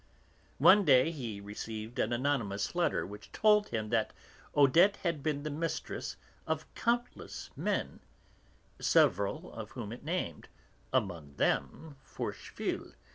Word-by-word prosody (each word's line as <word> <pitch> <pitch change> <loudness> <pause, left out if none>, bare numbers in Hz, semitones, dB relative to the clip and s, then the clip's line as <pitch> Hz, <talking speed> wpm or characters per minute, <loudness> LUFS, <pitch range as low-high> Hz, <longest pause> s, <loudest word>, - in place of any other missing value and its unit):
One 205 - +7
day 135 -1 +5
he 120 -10 -5
received 110 +3 -6
an 110 - +1
anonymous 120 -6 0
letter 175 0 +1
which 100 +1 -10
told 210 -1 +4
him 110 -2 -3
that 110 -1 +1 0.4
Odette 165 +8 +6
had 170 -5 0
been 145 -1 -1
the 155 - -3
mistress 165 +3 -3 0.3
of - - -1
countless 240 +1 -2
men - - -2 0.8
(several 100 +1 +2
of 110 -2 -7
whom 115 -5 -5
it 120 - -8
named, 155 - -3 0.4
among 85 - -1
them 150 - -1
Forcheville, - - -4
M. - - -20
130 Hz, 130 wpm, -32 LUFS, 105-165 Hz, 0.8 s, One